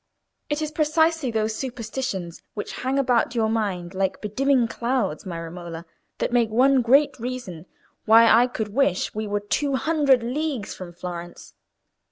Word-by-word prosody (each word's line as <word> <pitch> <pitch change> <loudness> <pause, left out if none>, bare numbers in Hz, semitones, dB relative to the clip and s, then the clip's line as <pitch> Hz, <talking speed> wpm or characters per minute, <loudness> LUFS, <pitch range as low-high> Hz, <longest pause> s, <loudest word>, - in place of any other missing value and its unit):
"It 295 +1 -1
is 305 - -3
precisely 315 -1 +2
those 220 -1 0
superstitions 230 -7 -4
which 205 - -5
hang 260 +2 0
about 245 -3 +2
your 220 -2 +1
mind 195 -6 -2
like 190 0 -1
bedimming 255 +3 +1
clouds, 235 -8 -2
my 170 -2 -4
Romola, 165 0 -7 0.3
that - - -2
make 235 -2 +3
one 260 +4 +4
great 270 +4 +3
reason 225 -9 -6 0.4
why 225 +1 +7
I 235 +2 +6
could 220 -4 -4
wish 215 -5 +1
we 215 0 -3
were 205 0 -1
two 275 +7 0
hundred 275 -2 +2
leagues 265 -2 -3
from 180 -2 -9
Florence. 175 0 -8
230 Hz, 155 wpm, -24 LUFS, 195-265 Hz, 0.4 s, why